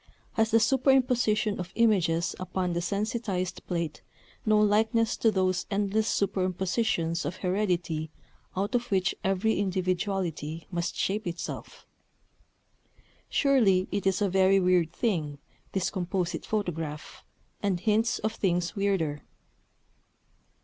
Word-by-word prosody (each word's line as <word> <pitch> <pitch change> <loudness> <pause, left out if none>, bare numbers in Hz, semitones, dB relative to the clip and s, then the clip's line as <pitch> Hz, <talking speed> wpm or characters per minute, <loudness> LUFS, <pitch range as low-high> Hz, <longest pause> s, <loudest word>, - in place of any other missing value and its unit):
Has 220 -1 +2
the 225 - +5
superimposition 245 -5 +2
of 180 0 -5
images 180 -8 +2
upon 185 -1 -2
the 170 - -1
sensitized 200 -1 -2
plate 170 -4 -3 0.5
no 215 0 +5
likeness 220 +2 +3
to 225 - +3
those 185 -3 0
endless 205 +1 0
superimpositions 185 -2 0
of 175 - -3
heredity 180 -5 -1 0.5
out 200 +5 -1
of 245 0 0
which 195 -1 +1
every 195 +3 +1
individuality 185 -4 -2
must 175 -1 -2
shape 210 +2 -1
itself?... 170 0 -6 1.4
Surely 220 -10 +3
it 200 -1 -1
is 195 +2 +2
a - - +3
very 190 +1 +4
weird 180 -3 +3
thing, 170 -8 -1 0.4
this 190 -2 0
Composite 180 -2 -2
Photograph, 165 -8 -4 0.4
and 195 -4 0
hints 225 +2 +2
of 215 +1 -2
things 180 -2 0
weirder. 190 -8 0
190 Hz, 115 wpm, -28 LUFS, 175-215 Hz, 1.4 s, the